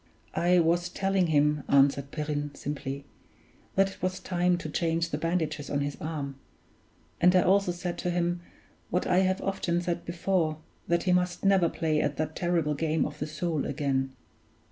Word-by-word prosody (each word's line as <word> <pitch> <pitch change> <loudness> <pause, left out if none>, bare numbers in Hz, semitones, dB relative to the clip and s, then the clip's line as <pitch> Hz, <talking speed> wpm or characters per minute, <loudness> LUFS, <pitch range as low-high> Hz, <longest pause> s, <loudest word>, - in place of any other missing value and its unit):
"I 180 +1 +3
was 175 +1 +2
telling 190 0 +1
him," 150 -1 +3
answered 140 0 +4
Perrine, 145 -1 -3
simply, 140 -1 -5 0.7
"that 195 0 +3
it - - -15
was 185 0 -1
time 180 -1 +1
to 170 - -6
change 165 +1 0
the 150 - -1
bandages 160 -3 -1
on 145 - 0
his 145 0 -2
arm; 145 -4 -4 0.8
and 180 +1 +6
I 180 - +6
also 195 -1 +3
said 175 0 -4
to 180 - -1
him, 175 0 0 0.5
what 180 - 0
I 180 0 +3
have 190 0 +1
often 175 -3 0
said 175 -1 -2
before, 170 -2 0 0.3
that 170 0 +2
he 180 - +2
must 180 +1 0
never 190 -4 +4
play 155 -2 0
at 145 -1 -1
that 155 0 -2
terrible 170 -4 +1
game 155 +1 0
of 145 - -6
the - - -2
Soule 155 -1 -2
again." 135 -2 -1
170 Hz, 175 wpm, -28 LUFS, 150-180 Hz, 0.8 s, and